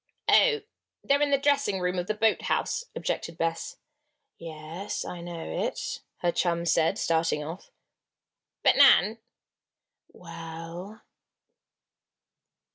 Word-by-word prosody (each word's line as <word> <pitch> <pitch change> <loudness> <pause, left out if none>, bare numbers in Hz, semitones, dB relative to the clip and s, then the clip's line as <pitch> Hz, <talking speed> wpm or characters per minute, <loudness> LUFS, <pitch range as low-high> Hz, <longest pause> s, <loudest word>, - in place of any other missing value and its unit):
"Oh! 450 -3 +5 0.4
they're 280 +1 +2
in 295 - +3
the 280 - +4
dressing 280 -8 +1
room 180 0 -1
of 175 - -4
the 215 - -1
boathouse," 225 - 0
objected 165 -1 -3
Bess. 165 0 -2 0.6
"Yes, 165 +4 -6
I 175 - -6
know 170 -1 -6
it," - - -3 0.2
her 175 - +2
chum 170 -1 0
said, 165 -1 +2
starting 160 -2 +1
off. 165 +5 -8 0.9
"But, - - +5
Nan!" 220 +2 +6 0.9
"Well?" 165 +4 -9
175 Hz, 110 wpm, -27 LUFS, 165-215 Hz, 0.9 s, Nan